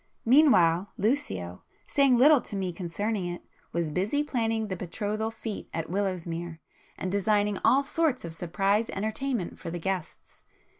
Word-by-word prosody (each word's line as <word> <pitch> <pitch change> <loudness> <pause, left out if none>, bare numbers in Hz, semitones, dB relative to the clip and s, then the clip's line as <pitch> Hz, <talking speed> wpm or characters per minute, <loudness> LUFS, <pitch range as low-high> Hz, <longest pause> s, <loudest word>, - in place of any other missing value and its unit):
Meanwhile, 205 - +5
Lucio, 95 - -1 0.2
saying 275 -3 +3
little 285 +2 +6
to - - -7
me 190 -2 -2
concerning 185 +3 -2
it, 175 0 -6 0.3
was 170 -2 -1
busy 205 - 0
planning 225 -5 -1
the 190 - -3
betrothal 205 +5 -3
fête 225 -1 -6
at 165 0 -3
Willowsmere, 175 -4 -2 0.4
and 185 - -3
designing 205 0 +1
all 275 +2 +5
sorts 290 - 0
of 165 - -6
'surprise' 195 +6 0
entertainments 220 +1 -3
for - - -5
the 175 - -4
guests. 185 0 -5
200 Hz, 145 wpm, -28 LUFS, 175-225 Hz, 0.4 s, little